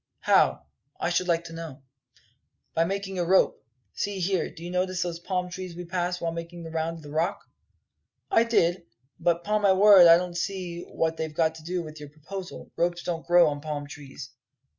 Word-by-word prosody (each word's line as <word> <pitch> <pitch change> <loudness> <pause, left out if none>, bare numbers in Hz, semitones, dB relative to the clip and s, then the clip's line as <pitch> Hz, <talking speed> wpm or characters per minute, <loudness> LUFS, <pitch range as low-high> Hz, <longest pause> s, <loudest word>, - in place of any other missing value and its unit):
"How, - - +3 0.3
I 175 - 0
should 180 +1 +1
like 170 -1 +1
to 165 -1 -10
know?" 165 -5 -8 0.9
"By 165 - +2
making 195 0 -3
a - - +2
rope. 185 +3 +3 0.3
See 205 -1 -3
here, 185 0 0
did - - -14
you 175 +1 -6
notice 180 0 0
those 170 -1 -4
palm 180 0 -3
trees 185 -2 -7
we 175 +1 -7
passed 180 +1 -2
while 165 -1 -2
making 170 +1 -7
the 165 - -8
round 165 +1 -2
of 160 - -13
the 145 - -10
Rock?" 165 +6 -1 0.9
"I 350 - +5
did; 175 -7 +1 0.3
but 170 0 +1
'pon 210 0 0
my 200 -2 +5
word 195 -2 +8
I 165 0 +9
don't 175 0 -4
see 175 -1 -3
what 165 0 -1
they've 160 -1 -3
got 160 -1 +2
to 160 -1 -12
do 175 +1 -2
with 155 -1 -10
your 145 -1 -9
proposal. 180 +6 -9
Ropes 175 0 0
don't 165 -2 -4
grow 175 0 +6
on 145 -1 -5
palm 150 -2 -4
trees." 140 -3 -10
175 Hz, 205 wpm, -26 LUFS, 165-185 Hz, 0.9 s, I